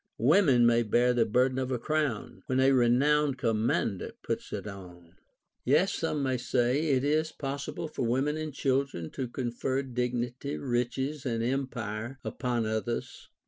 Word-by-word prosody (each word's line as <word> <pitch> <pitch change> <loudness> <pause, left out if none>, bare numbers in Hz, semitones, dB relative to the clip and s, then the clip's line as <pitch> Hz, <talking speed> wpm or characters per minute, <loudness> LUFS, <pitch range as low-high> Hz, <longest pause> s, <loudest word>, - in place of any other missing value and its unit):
Women 135 - +5
may 120 0 +4
bear 120 +3 +3
the 115 -2 +2
burden 125 +4 +2
of 130 -1 -2
a 130 - 0
crown, 145 -3 -2
Wlien 130 0 +2
a 135 +1 +5
renowned 135 +3 +3
commander 110 -4 0
puts - - -3
it - - -4
on* 90 -4 -10 0.5
Yet - - +3
some 145 -2 -1
may 130 -1 +1
say, 125 +5 +1
it 130 -2 +2
is 155 +2 +1
possible 140 +3 -4
for 155 - -6
women 130 +5 +1
and 155 -1 -4
chil 135 0 +1
dren 85 - -7
to 130 -2 -3
confer 130 +2 -2
dignity, 125 +1 -3
riches, 130 +3 -2
and 115 -3 -1
empire 120 -2 -3
upon 120 -2 -1
others. 110 +2 -3
125 Hz, 155 wpm, -29 LUFS, 120-140 Hz, 0.5 s, Women